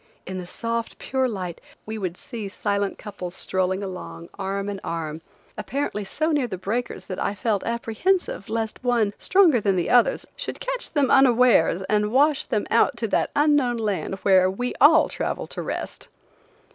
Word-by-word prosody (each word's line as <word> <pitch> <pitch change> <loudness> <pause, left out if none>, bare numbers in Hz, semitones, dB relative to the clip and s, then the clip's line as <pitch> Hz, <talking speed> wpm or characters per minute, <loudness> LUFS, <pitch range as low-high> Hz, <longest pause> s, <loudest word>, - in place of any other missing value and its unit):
In 185 0 -5
the 180 - -7
soft, 230 +3 -3
pure 260 -1 0
light 185 -6 -5 0.2
we 220 0 -5
would 185 -3 -3
see 225 -5 -6
silent 200 0 -1
couples 185 -4 -7
strolling 190 +1 -1
along 85 - -7
arm 195 0 -3
and 200 -1 -4
arm, 160 -1 -4 0.4
apparently 270 -6 -2
so 310 +11 -1
near 290 -5 +1
the 190 - -5
breakers 220 +7 -3
that 185 - -5
I 205 - -1
felt 210 -1 0
apprehensive 235 - -1
lest 220 +2 -3
one, 235 -5 +2
stronger 350 - +4
than 195 -2 +2
the 175 -2 0
others, 245 -1 +4
should - - -5
catch - - -3
them 280 -4 +2
unawares 245 -9 +5
and 210 +1 +1
wash 285 +3 +3
them 210 - -1
out 235 +2 +3
to 230 - -1
that - - +1
unknown 290 -5 +3
land 205 -3 -2
where 185 -1 +5
we 245 +6 -3
all 310 +3 +7
travel - - -3
to - - -6
rest. - - -5
215 Hz, 170 wpm, -24 LUFS, 190-250 Hz, 0.4 s, all